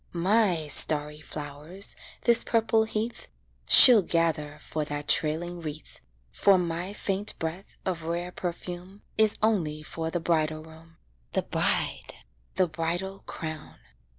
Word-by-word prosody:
My 180 -2 +1
starry 150 0 +2
flowers 150 +6 -5 0.3
this 235 -1 +5
purple 225 -1 +1
heath 220 +2 -5 0.4
She'll 245 -5 +10
gather 165 -4 -1
for 155 - -4
that 145 0 -6
trailing 170 +3 +1
wreath; 155 -1 -9 0.3
For 190 - +3
my 175 +1 -3
faint 200 0 -2
breath 165 +5 -6
of 180 -3 -3
rare 170 +2 -4
perfume 180 +2 -7 0.2
Is 220 -1 +4
only 160 -9 0
for 160 +1 -5
the 175 - -3
bridal 155 -2 -1
room 160 +1 -17 0.4
The - - 0
bride - - -1 0.4
the 185 - +2
bridal 170 +4 -4
crown. 160 -2 -8
170 Hz, 125 wpm, -26 LUFS, 155-190 Hz, 0.4 s, She'll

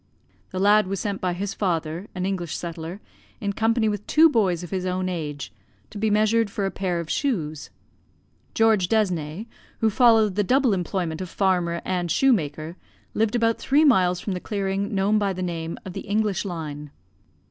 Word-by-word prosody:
The 185 - -6
lad 205 +1 +4
was 195 0 -3
sent 200 -2 -3
by 180 -1 0
his 195 +3 -3
father, 170 -1 -2
an 185 0 -2
English 180 -4 -2
settler, 170 +3 -6 0.4
in 200 -1 -2
company 225 +1 +1
with 210 -1 -3
two 320 +1 +6
boys 185 - +1
of 175 - -9
his 190 -2 -2
own 185 0 -1
age, 150 - -5 0.4
to 205 - -7
be 220 +1 +1
measured 215 +1 +2
for 200 0 -2
a 195 - -1
pair 180 -3 -2
of 170 - -5
shoes. 155 - -2 0.9
George 220 -5 +3
Desne, 185 -4 0 0.3
who 220 -1 +2
followed 220 -2 +5
the 205 +2 +1
double 255 +2 +3
employment 180 -2 -2
of 185 - -5
farmer 175 -3 0
and 180 -2 -1
shoemaker, 165 - +1 0.4
lived 220 +1 +1
about 230 -1 +2
three 295 +3 +3
miles 180 -9 +4
from 195 - -3
the 180 - -3
clearing 200 0 -2
known 200 +2 +2
by 200 -2 0
the 185 0 -4
name 165 -2 -4
of 185 - -7
the - - -5
English 210 -2 0
line. 150 -5 -5
190 Hz, 180 wpm, -24 LUFS, 175-215 Hz, 0.9 s, two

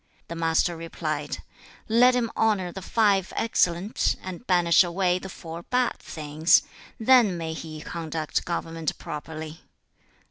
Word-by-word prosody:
The 170 - -5
Master 165 +1 +1
replied, 155 -3 -4 0.4
'Let 245 +3 +5
him 235 -2 0
honour 205 -5 +1
the 190 - -7
five 200 -2 +2
excellent, 190 -2 +1
and 185 +5 -8
banish 175 -1 +5
away 180 +1 0
the 190 - -8
four 165 -1 -8
bad, 250 +6 0
things; 155 +1 +2 0.4
then 225 -5 +5
may 165 -1 -4
he 155 -1 -7
conduct 160 -2 -3
government 165 -2 -3
properly.' 155 +1 -7
170 Hz, 130 wpm, -26 LUFS, 160-195 Hz, 0.4 s, Let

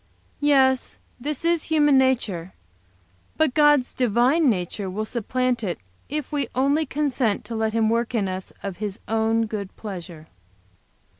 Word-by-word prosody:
"Yes, 265 -3 +3 0.2
this 295 +4 -4
is 335 -2 +2
human 295 -3 +4
nature. 230 -10 +1 0.8
But 315 -5 +2
God's 295 -3 +4
divine 255 +6 +3
nature 190 -1 -2
will 210 +4 -3
supplant 250 +2 -1
it, 175 -5 -2 0.3
if 300 -1 -4
we 285 -4 -1
only 280 +4 +2
consent 265 -7 0
to 230 - -6
let 220 -1 0
Him 225 -1 +2
work 235 +1 0
in 205 -4 +1
us 185 0 -5
of 195 -3 -5
His 210 0 -4
own 225 0 +1
good 205 -3 -6
pleasure." 175 -6 -8
235 Hz, 145 wpm, -24 LUFS, 210-280 Hz, 0.8 s, human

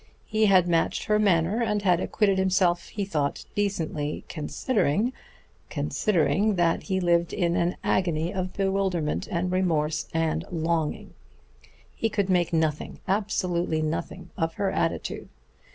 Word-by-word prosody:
He 215 0 +2
had 185 -3 +5
matched 165 -1 +1
her 210 -1 +2
manner 195 +2 +2
and 210 -3 0
had 180 -3 +3
acquitted 195 0 +1
himself, 180 -3 +2
he 205 -1 -3
thought, 150 -7 -2
decently, 165 -7 -2
considering... 210 - 0 0.6
considering 205 +2 +1
that 170 -2 +2
he 190 -2 -1
lived 170 -1 +2
in 175 -2 +1
an 175 +1 0
agony 170 -1 0
of 185 -1 -2
bewilderment 190 -5 -1
and 180 +1 -1
remorse 160 -5 0
and 165 0 0
longing. 165 -2 -1 0.8
He 225 - -1
could 200 -3 0
make 175 -2 +2
nothing, 160 -2 -1
absolutely 180 -5 0
nothing, 170 +3 -4
of 165 -2 -2
her 200 -1 0
attitude. - - -2
180 Hz, 135 wpm, -26 LUFS, 165-195 Hz, 0.8 s, had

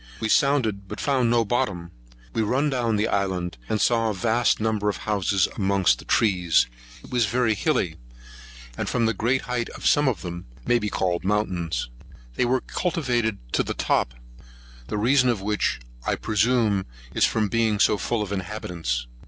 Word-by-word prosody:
We 110 - -2
sounded, 110 -8 +2
but - - -7
found 130 -4 +1
no 115 -1 +3
bottom. 100 -8 -1 0.4
We - - 0
run 135 +7 +1
down 120 -4 0
the 105 +1 +1
island, 90 -6 -1
and 110 - 0
saw 115 0 +2
a 105 - -2
vast 115 +4 +2
number 110 -1 0
of 100 - -2
houses 100 -2 +1
amongst 100 -2 +2
the - - -11
trees. 90 -6 +3 0.4
It - - -12
is 120 -3 +3
very 120 0 +2
hilly, 105 - 0 0.8
and, - - -3
from 120 -2 +1
the 115 - +2
great 120 +6 +1
height 125 -2 -3
of - - -9
some 145 -1 +4
of 110 -10 -1
them, 85 -3 -6 0.2
may 120 - +3
be 105 -2 -2
called 90 -3 -1
mountains. 95 - -1 0.5
They 60 - +1
are 125 +1 +1
cultivated 125 - -1 0.2
to - - +3
the - - -3
top; - - 0 0.7
the - - -3
reason 125 +4 +3
of 115 -4 +1
which, 105 -10 0 0.2
I - - 0
presume, 110 -3 +1 0.3
is - - +4
from 110 - +1
its 105 - -2
being 115 -2 +2
so 105 0 +3
full 115 -3 -1
of 100 - -7
inhabitants. 90 - -3
110 Hz, 180 wpm, -24 LUFS, 95-120 Hz, 0.8 s, some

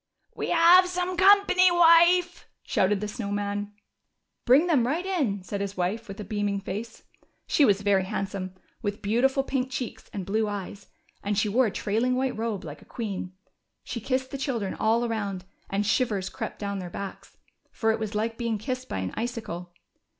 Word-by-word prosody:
^^We - - -3
have 345 +2 +7
some 360 0 -2
company, 380 -1 +6
Avife," 345 +1 +5 0.2
shouted 195 +1 +1
the - - -2
SnoAv 210 -1 -4
Man. 205 0 -2 0.7
Bring 270 +7 +6
them 285 -9 +2
right 325 +7 -1
in," 270 - -1
said 200 +1 -4
his 200 0 -4
Avife 190 +5 -2
Avith 195 +1 -8
a - - -4
beaming 205 -1 -1
face. 210 +4 -6 0.4
She 290 - +4
was 200 -2 +2
very 195 -2 +3
handsome, 190 -1 -4 0.3
with 205 -2 -4
beautiful 265 +6 +2
pink 265 -1 -2
cheeks 260 -2 -6
and 195 -3 -5
blue 215 +3 0
eyes, 205 0 -6 0.3
and 205 0 -2
she 210 +1 +2
wore 245 +4 +3
a - - -3
trailing 225 +7 0
AAdiite 260 0 0
robe, 225 -4 -2
like 150 -2 -9
a - - -14
queen. 200 -6 -5 0.5
She 235 - -5
kissed 260 +2 -1
the 275 - -5
children 235 -8 -2
all 230 +2 +1
around, 200 -5 -3 0.2
and 200 +1 0
shivers 205 -3 0
crept - - -6
doAvn 200 -1 -2
their 180 -1 -6
backs, 195 +2 -8 0.3
for 225 -2 +1
it 220 - -1
was 215 -1 -4
like 225 +2 -2
being 230 -2 -1
kissed 255 +4 -5
by - - -3
an 95 -1 -3
icicle. 220 -7 -5
220 Hz, 185 wpm, -26 LUFS, 200-260 Hz, 0.7 s, have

